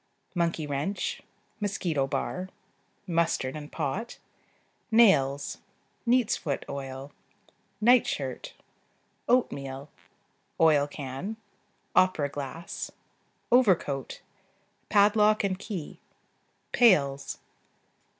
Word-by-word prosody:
Monkey 170 Hz, -3 st, 0 dB
wrench. 145 Hz, +7 st, -2 dB, 0.4 s
Mosquito 175 Hz, -9 st, -1 dB
bar. 180 Hz, +6 st, -3 dB, 0.6 s
Mustard 165 Hz, -7 st, 0 dB
and 150 Hz, -1 st, -8 dB
pot. 180 Hz, -, -3 dB, 0.7 s
Nails. 145 Hz, -, +4 dB, 0.5 s
Neat's 245 Hz, -2 st, +3 dB
foot 140 Hz, -4 st, -3 dB
oil. 135 Hz, 0 st, -6 dB, 0.7 s
Night 245 Hz, +3 st, +5 dB
shirt. -, -, -4 dB, 0.7 s
Oatmeal. 140 Hz, -, 0 dB, 0.7 s
Oil 150 Hz, -3 st, +5 dB
can. 145 Hz, +9 st, -6 dB, 0.6 s
Opera 185 Hz, -6 st, +3 dB
glass. 145 Hz, +5 st, -6 dB, 0.6 s
Overcoat. 180 Hz, -, +2 dB, 0.7 s
Padlock 210 Hz, +1 st, +4 dB
and 190 Hz, -1 st, -1 dB
key. 190 Hz, -8 st, -6 dB, 0.7 s
Pails. 140 Hz, -, +3 dB
165 Hz, 75 wpm, -28 LUFS, 140-205 Hz, 0.7 s, Night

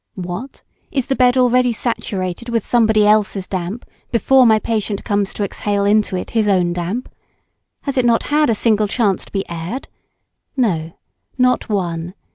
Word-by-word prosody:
What? 185 Hz, +8 st, -7 dB, 0.3 s
is 270 Hz, -5 st, -1 dB
the 270 Hz, -, -1 dB
bed 250 Hz, 0 st, +3 dB
already 250 Hz, 0 st, +3 dB
saturated 215 Hz, -2 st, -3 dB
with 230 Hz, -3 st, -1 dB
somebody 220 Hz, -3 st, +3 dB
else's 210 Hz, -2 st, +2 dB
damp 185 Hz, +5 st, -4 dB, 0.3 s
before 255 Hz, +2 st, +4 dB
my 220 Hz, -1 st, +5 dB
patient 215 Hz, -2 st, -2 dB
comes 205 Hz, -2 st, 0 dB
to 205 Hz, -, -3 dB
exhale 200 Hz, 0 st, -1 dB
in 210 Hz, +1 st, +4 dB
it 180 Hz, -, -5 dB
his 220 Hz, -2 st, +1 dB
own 180 Hz, -3 st, +2 dB
damp? 180 Hz, +8 st, -3 dB, 0.8 s
Has 275 Hz, -2 st, -1 dB
it 250 Hz, -, +2 dB
not 235 Hz, -1 st, +3 dB
had 300 Hz, -2 st, +3 dB
a 225 Hz, -, +2 dB
single 215 Hz, -1 st, +2 dB
chance 205 Hz, -3 st, 0 dB
to -, -, -18 dB
be 195 Hz, -1 st, -3 dB
aired? 170 Hz, +10 st, -6 dB, 0.7 s
No, 170 Hz, -10 st, 0 dB, 0.4 s
not 250 Hz, -1 st, +2 dB
one. 175 Hz, -3 st, -2 dB
215 Hz, 165 wpm, -18 LUFS, 190-240 Hz, 0.8 s, my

